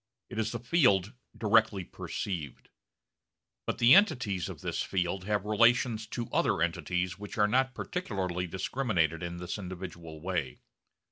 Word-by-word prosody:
It 115 - -4
is 110 0 0
the 120 - -3
field 110 - +3 0.2
directly 110 -3 +3
perceived. 85 -5 -5 1.0
But - - -1
the 120 +1 +7
entities 120 - +3
of - - -8
this - - -2
field 90 0 -1
have 105 -1 0
relations 115 +1 +3
to 120 +1 -4
other - - +2
entities 90 +2 -1
which 105 -1 -8
are 105 -1 +4
not 130 +4 +1
particularly 95 - -3
discriminated 90 - 0
in 85 0 -4
this 90 +3 -5
individual 85 -4 -7
way. 80 -7 -2
100 Hz, 140 wpm, -30 LUFS, 90-115 Hz, 1.0 s, the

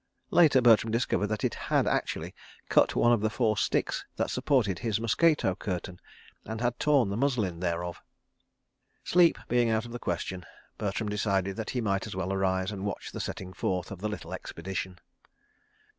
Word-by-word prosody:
(Later 155 -7 +6
Bertram 115 -1 +5
discovered 115 -3 +1
that 110 0 -3
it - - +1
had - - 0
actually - - -1 0.4
cut - - +4
one 120 0 +4
of 115 - +1
the 110 - +1
four 110 -1 +1
sticks - - 0
that - - -1
supported 105 - +1
his 110 +1 -1
mosquito 130 - +2
curtain, 90 -1 -5 0.4
and 110 0 -5
had 120 0 -1
torn 140 -8 +3
the - - -2
muslin 115 -9 0
thereof.) 85 -1 -3 1.0
Sleep 175 -1 +4
being 120 -1 +2
out 110 +1 +1
of 120 - -9
the 120 - -5
question, 90 0 -3 0.4
Bertram 105 +1 -2
decided 100 -2 0
that 110 - -4
he 125 - -1
might 100 -1 -1
as 100 - -7
well 95 0 -2
arise 95 0 0
and 100 -2 -6
watch 100 - -4
the - - -6
setting 95 -1 -5
forth 90 0 -2
of 100 - -7
the 105 - -1
little 105 - -6
expedition. 90 +1 -5
105 Hz, 175 wpm, -29 LUFS, 95-120 Hz, 1.0 s, Later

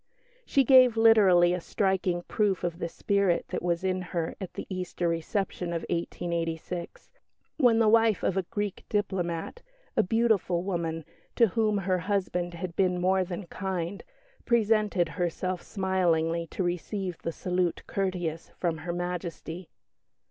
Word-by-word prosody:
She 275 - +4
gave 255 -2 +6
literally 195 -6 +6
a 180 - -2
"striking" 185 -2 0
proof 200 -3 0
of 175 -1 -2
the 170 - -2
spirit 200 -1 +1
that - - -3
was 175 0 -1
in 185 -1 0
her 170 -2 -3
at 190 - -7
the - - -5
Easter 180 -2 -3
reception 175 +2 -2
of 165 - -3
1886, 170 0 -3 0.5
when 245 -6 +5
the 225 -1 +4
wife 225 -2 +4
of 185 - +1
a 190 - +2
Greek 205 +1 -4
diplomat 190 - -2 0.3
a - - +5
beautiful 205 -4 +1
woman, 165 -4 -2 0.3
to 230 -3 +5
whom 215 +1 +1
her 185 -1 0
husband 180 -2 -1
had 170 -1 -5
been 180 -2 +2
more 185 +1 +2
than 180 +1 -6
kind 185 0 -4 0.4
presented 215 -5 +2
herself 180 +1 -2
smilingly 170 -4 0
to 185 - -3
receive 180 +1 -3
the 165 - -3
"salute 180 0 -1
courteous" 175 -4 -2
from 165 -3 -1
Her 170 +3 -4
Majesty. 175 -1 -5
180 Hz, 145 wpm, -28 LUFS, 170-200 Hz, 0.5 s, gave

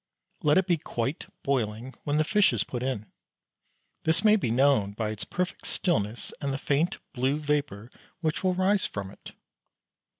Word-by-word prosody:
Let 150 +2 +4
it 190 - +4
be 175 -3 +2
quite 135 -2 -3 0.2
boiling 125 -2 -1
when 145 0 +1
the 155 - +4
fish 205 - +4
is 110 - +1
put 120 - -5
in. 125 -5 -3 0.9
This 160 +3 +1
may 215 -1 +7
be 190 - 0
known 120 -5 +3
by 110 0 -2
its 105 -1 -4
perfect 180 0 -3
stillness 110 - -1
and 140 - -1
the 135 - -1
faint 150 +5 +1 0.2
blue 130 +3 +1
vapour 145 -7 -1 0.3
which 160 -1 -1
will 185 -1 +2
rise 190 +2 +2
from 100 -2 -5
it. - - -12
140 Hz, 170 wpm, -28 LUFS, 115-165 Hz, 0.9 s, may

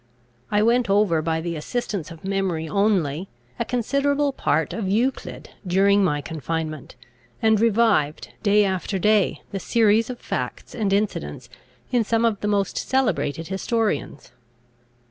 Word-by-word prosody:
I 210 0 +2
went 235 0 +2
over, 195 -5 +3
by 160 0 -1
the 170 0 -3
assistance 195 +1 -3
of 165 +1 -11
memory 190 -5 -1
only, 185 -3 +1 0.3
a - - 0
considerable 280 +4 0
part 160 - 0
of 205 -5 -3
Euclid 240 +7 -1 0.2
during 200 +2 +4
my 145 -5 +1
confinement, 155 -1 -5 0.4
and 220 -1 +3
revived, 220 -9 +2
day 205 0 +4
after 190 +1 -2
day, 210 +2 +2
the 195 - -3
series 225 +1 +3
of 250 - -5
facts - - -5
and 210 -5 -1
incidents 130 - -2 0.4
in 245 -3 +3
some 230 +1 +1
of 220 -3 +1
the 210 - -1
most 200 -2 0
celebrated 190 - 0
historians. 220 +3 -2
200 Hz, 140 wpm, -23 LUFS, 165-225 Hz, 0.4 s, during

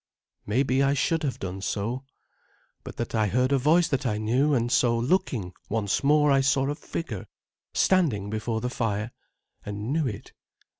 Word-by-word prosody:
Maybe 130 +4 +2
I 140 +1 +3
should 165 +4 +1
have 140 -5 -2
done 95 0 -5
so, 115 +6 -3 0.8
but - - -9
that 120 - -4
I 110 -2 +2
heard 125 +6 +1
a 140 - +3
voice 160 +5 +4
that 135 -1 0
I 110 -5 0
knew; 125 +8 +1
and 120 -1 0
so, 120 -2 +3
looking 120 - 0 0.2
once 105 +1 0
more, 150 +1 +4
I 135 0 +4
saw 135 0 +2
a - - -1
figure 145 - -6 0.5
standing 130 - +2
before 110 +1 -2
the 125 - -1
fire, 110 -2 -2 0.5
and 105 +5 -4
knew 155 -3 +1
it. 105 -5 -7
125 Hz, 170 wpm, -26 LUFS, 110-140 Hz, 0.8 s, voice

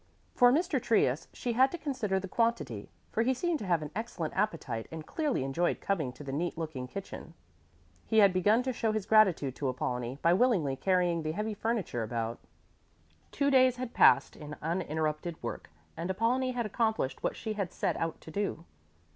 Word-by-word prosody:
For 245 0 +6
Mr. 300 -2 +1
Trius 160 - +2
she 240 - -3
had 260 +3 +5
to 345 - -4
consider 255 - -1
the 195 - -6
quantity, 230 - -1 0.2
for 225 - +1
he 260 +3 +2
seemed 340 +3 -1
to 205 - -6
have 170 -3 +2
an 150 - -7
excellent 205 -8 -4
appetite 130 - -2
and 160 -1 -7
clearly 295 - -1
enjoyed 150 +6 0
coming 160 -10 -1
to 145 - -11
the 135 - -5
neat 165 +5 -2
looking 155 -6 -4
kitchen. 170 +1 -8 0.7
He 220 - +1
had 200 -3 +7
begun 210 +6 +3
to 260 0 -1
show 225 -2 0
his 215 -3 -2
gratitude 190 - +4
to 140 - -1
Apollonie 125 0 -3
by 170 - +5
willingly 185 - +2
carrying 180 0 +1
the 155 0 -2
heavy 215 +4 -2
furniture 210 - -2
about. 115 +1 -3 0.9
Two 280 0 +1
days 255 -2 +5
had 250 -1 -5
passed - - +5
in 150 0 -8
uninterrupted 160 -1 -2
work, 120 - -5 0.3
and 170 +3 -4
Apollonie 245 +6 +1
had 240 -2 -1
accomplished 220 - -1
what - - -1
she 220 -1 -4
had 200 -4 -3
set - - -1
out 165 0 -3
to 160 - -11
do. 195 -3 -3
190 Hz, 190 wpm, -30 LUFS, 155-230 Hz, 0.9 s, had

